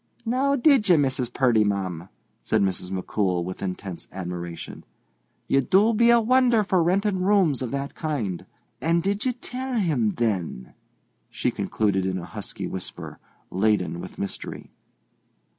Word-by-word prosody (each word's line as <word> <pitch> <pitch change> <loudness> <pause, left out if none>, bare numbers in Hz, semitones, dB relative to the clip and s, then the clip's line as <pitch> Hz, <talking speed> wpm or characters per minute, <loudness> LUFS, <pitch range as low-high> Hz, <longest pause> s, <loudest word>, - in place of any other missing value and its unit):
"Now, 265 +4 +2
did 265 -6 +4
ye, 175 - +8
Mrs. 130 -4 0
Purdy, 120 -4 +3
ma'am?" 95 -4 -2 0.3
said - - +1
Mrs. 95 -1 -1
McCool, 95 -1 -1
with 95 +1 -6
intense 95 -1 -5
admiration. 85 -2 -6 0.6
"You 135 - +3
do 200 - +4
be 235 +2 +4
a 235 0 +7
wonder 245 -1 +4
for 190 -3 +2
rentin' 190 +3 +1
rooms 185 -8 +3
of 125 - -2
that 140 +1 -3
kind. 125 - -3 0.3
And 165 +1 +2
did 200 +5 0
ye 250 - +1
tell 255 +1 -5
him, 145 - +1
then?" 95 - -2 0.6
she - - -1
concluded 95 -3 0
in 95 0 -1
a 85 - -6
husky - - -6
whisper, 95 -1 -6 0.3
laden 95 -4 +1
with - - -9
mystery. 100 - -6
130 Hz, 145 wpm, -25 LUFS, -, 0.6 s, ye